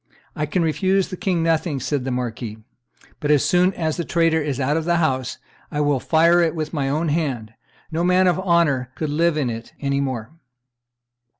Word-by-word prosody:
"I 150 - -2
can 175 +3 0
refuse 190 +4 +1
the - - -5
king 180 -4 0
nothing," 160 -3 0
said 135 0 -2
the - - -2
marquis; 120 -3 -4 0.6
"but 145 - -2
as 150 -2 +4
soon 180 +1 +3
as 160 -1 -1
the 170 - -1
traitor 165 -1 +2
is 145 -3 -2
out 140 +2 +1
of 160 - 0
the 170 0 +2
house, 130 -7 0 0.3
I 145 - -3
will 145 -2 +2
fire 170 +5 +4
it 165 -1 +1
with 155 0 -4
my 140 -3 -1
own 155 +3 0
hand; 135 -9 -2 0.4
no 165 +2 -1
man 180 +1 +4
of 180 0 +2
honor 170 -9 +2
could 150 +2 -3
live 165 +1 +2
in 130 -5 0
it 115 +1 -8
any 140 -1 0
more." 130 -4 -3
155 Hz, 200 wpm, -22 LUFS, 135-170 Hz, 0.6 s, as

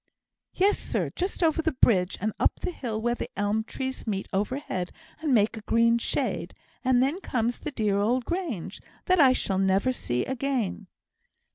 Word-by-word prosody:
"Yes, 395 +2 +3
sir, - - -2
just 370 0 -2
over 325 0 +3
the 320 -1 0
bridge, 195 -7 +3
and 215 +2 -1
up - - +2
the - - -2
hill 230 -9 -4
where 240 +2 +1
the - - -5
elm 205 +2 +1
trees 260 +2 -5
meet 195 -2 -2
overhead 200 -3 -2 0.3
and 310 -3 0
make 220 -2 +3
a 220 - -7
green 230 +2 +3
shade; - - -1 0.3
and 255 -1 +4
then 300 +8 -1
comes 240 - -1
the - - -4
dear 210 -7 0
old 240 +4 +1
Grange, 315 - -3 0.2
that 370 -1 +3
I 265 -3 +7
shall 195 -6 0
never 195 +6 +3
see 125 - -2
again." 255 -7 -2
235 Hz, 175 wpm, -27 LUFS, 205-275 Hz, 0.3 s, I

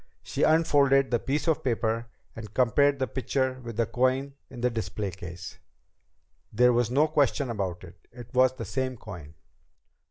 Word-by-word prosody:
She - - -4
unfolded 140 -4 +4
the 120 - +2
piece 145 +7 -2
of 160 - +1
paper 115 -2 -1 0.3
and 110 -3 -8
compared 140 +3 +3
the 130 - 0
picture 130 +1 -2
with 115 -2 -7
the 115 - +2
coin 130 +4 0 0.2
in 120 - -9
the 125 0 +1
display 105 -3 -3
case. 90 -1 -9 0.9
There 125 +3 +4
was 120 -1 +1
no 145 +5 +3
question 140 -3 +1
about 95 -5 -3
it. 85 -1 -15
It 120 0 -12
was 130 0 +4
the - - -6
same 130 -1 -3
coin! 85 -9 -10
125 Hz, 165 wpm, -27 LUFS, 110-135 Hz, 0.9 s, unfolded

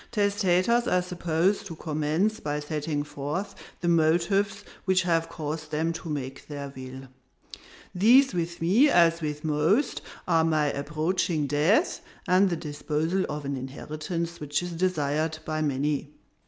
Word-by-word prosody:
"Testators 205 +2 +2
are 180 0 +2
supposed 180 +2 0
to 165 - -7
commence 155 +8 0
by 150 -6 -2
setting 150 0 -2
forth 150 +8 -4 0.3
the 175 - -1
motives 175 +5 +2 0.2
which 185 -1 +3
have 165 -2 +1
caused 155 -1 -5
them 160 +2 0
to 165 0 -7
make 135 -2 -5
their 140 -2 -6
will. 130 0 -8 0.9
These 240 +8 +5
with 170 -1 -2
me, 225 - +5
as 170 -5 +4
with 150 -1 -3
most, 160 - +1 0.3
are 165 -2 +4
my 155 -3 +2
approaching 155 +2 -1
death, 160 - +2 0.3
and 185 +2 +4
the 175 - 0
disposal 155 +4 -1
of 150 -1 -4
an 140 0 -2
inheritance 155 +6 -5
which 150 +3 -1
is 175 - -4
desired 160 -3 0
by 155 0 -2
many. 145 +1 -1
165 Hz, 140 wpm, -27 LUFS, 150-185 Hz, 0.9 s, These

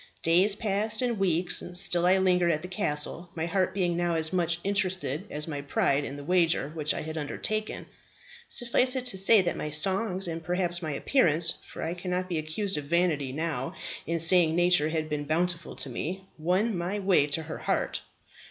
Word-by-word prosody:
"Days 185 +5 +4
passed, 215 +2 -1
and 235 -4 0
weeks; 180 -2 +1
still 180 -1 +2
I 185 +1 +5
lingered 180 -2 +3
at 155 0 -1
the - - -4
castle, 175 -2 -2
my 160 -1 -1
heart 185 +2 +1
being 180 -3 0
now 175 -1 0
as 160 +1 -1
much 170 -2 +1
interested 190 -7 -1
as 150 +1 -3
my 145 -3 -4
pride 140 0 +1
in 140 - -5
the 145 - -8
wager 165 -3 +2
which 150 -2 -1
I - - -2
had 160 +1 -4
undertaken. 215 +8 -3 0.6
Suffice 250 +1 +2
it 255 -1 -2
to 220 -6 -2
say, 200 +2 +6
that 175 -2 -1
my 150 - -4
songs, 190 +4 0
and 165 -1 -4
perhaps 175 0 0
my 160 - -3
appearance 165 - +2
for - - -7
I 165 - -2
cannot 180 +1 -3
be 170 -3 -1
accused 190 +5 -2
of 145 - -7
vanity 160 -4 +1
now 150 -3 -3 0.3
in 170 +1 0
saying 165 -1 +4
nature 175 -3 +3
had 160 -1 -1
been 150 -1 -3
bountiful 170 +3 -1
to 140 - -5
me 185 +9 -4
won 185 +7 +1
my 175 +4 -2
way 190 -7 +3
to 150 +2 -2
her 160 0 -6
heart. - - -1
175 Hz, 195 wpm, -28 LUFS, 155-190 Hz, 0.6 s, say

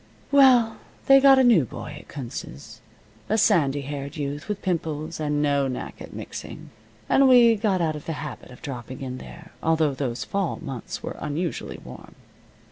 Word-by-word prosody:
Well, 255 -5 +5 0.3
they 270 0 +8
got 270 0 +7
a 265 - +5
new 230 - +6
boy 120 - -8
at - - -17
Kunz's 120 - -8 0.5
a 220 - +2
sandy 145 -11 +3
haired 140 +1 -6
youth, 145 +4 -4
with 205 -1 -3
pimples, 160 -3 -2
and 150 -1 0
no 140 -2 +2
knack 130 -1 -6
at - - -9
mixing, - - -8 0.4
and 275 0 +5
we 240 -2 +7
got 200 -4 0
out 160 -2 0
of 150 - -9
the 165 - -1
habit 150 0 -7
of 125 - -14
dropping 130 -2 -7
in 130 -1 -5
there, 165 +1 -12
although 160 -3 +2
those 130 -3 -3
fall 195 -3 -2
months 130 -4 -6
were - - -5
unusually 155 +3 -3
warm. 65 0 -12
155 Hz, 175 wpm, -24 LUFS, 140-205 Hz, 0.5 s, they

